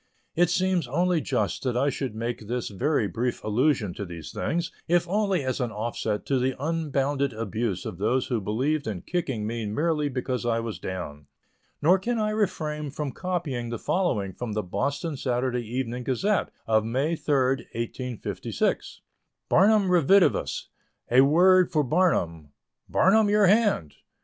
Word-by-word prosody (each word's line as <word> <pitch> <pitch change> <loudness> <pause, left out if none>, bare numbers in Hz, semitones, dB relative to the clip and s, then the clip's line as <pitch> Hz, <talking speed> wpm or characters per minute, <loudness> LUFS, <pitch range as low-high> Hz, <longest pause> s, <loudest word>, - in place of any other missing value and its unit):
It 175 0 +3
seems 185 -4 +1
only 170 +5 +1
just 110 -11 -1
that 125 -2 -1
I 140 +3 +2
should 130 -4 -4
make 115 -1 -4
this 120 +1 -2
very 120 +3 0
brief 120 +7 -2
allusion 110 - +1
to 100 - -5
these 85 -4 -8
things, 170 +2 -2 0.2
if 175 +1 +2
only 195 -3 +1
as 130 +1 -2
an 120 -2 -1
offset 110 -1 -3
to 135 -2 +1
the 130 +1 0
unbounded 140 -3 0
abuse 110 -2 -3
of 85 - -6
those 120 +5 +1
who 120 -4 -1
believed 130 +9 -1
in 100 -5 -4
kicking 135 -11 -2
me 115 0 -3
merely 150 +6 0
because 130 -1 -2
I 115 -1 +1
was 115 -2 -5
down; 75 -6 -6 0.6
nor 180 +5 +5
can 235 +5 -1
I 215 -1 0
refrain 155 -8 -1
from 145 0 -4
copying 150 -8 -3
the 120 - -3
following 110 - 0
from 115 +3 -5
the 105 0 -1
Boston 140 - -2
Saturday 125 -1 -1
Evening 125 +1 -3
Gazette, 185 - 0 0.2
of 110 -1 +3
May 135 +9 0
3, 150 -2 0 0.4
1856: 115 +1 -3 0.5
BARNUM 205 +2 +5
REDIVIVUS. 180 +3 +3 0.4
A 125 +2 +7
WORD 180 +6 +5
FOR 150 -2 +2
BARNUM. 90 - +1 0.4
BARNUM, 210 +2 +4
your 210 0 +4
hand! 200 - +3
130 Hz, 155 wpm, -26 LUFS, 115-170 Hz, 0.6 s, A